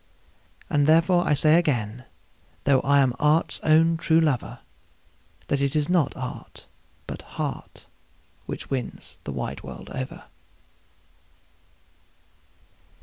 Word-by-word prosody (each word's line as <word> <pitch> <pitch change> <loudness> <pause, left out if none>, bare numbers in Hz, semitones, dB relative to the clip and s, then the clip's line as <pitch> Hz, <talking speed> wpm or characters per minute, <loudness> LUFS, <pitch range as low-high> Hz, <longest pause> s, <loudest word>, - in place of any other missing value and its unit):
And 145 0 +2
therefore 170 +3 +4
I 150 - +3
say 155 +3 +5
again, 125 -6 -2 0.6
though 135 -1 +4
I 140 +1 +3
am 130 -2 +2
art's 150 +2 +2
own 165 +1 +4
true 160 0 +3
lover, 150 -7 0 0.9
That 140 - -1
it 140 0 0
is 150 0 +1
not 170 -6 +1
art, 130 -1 -8 0.4
but - - -7 0.2
heart, - - -5 0.6
which - - -7
wins 130 -3 -5
the - - -4
wide - - -5
world 65 -2 -10
over. 130 0 -6
145 Hz, 115 wpm, -25 LUFS, 130-160 Hz, 0.9 s, say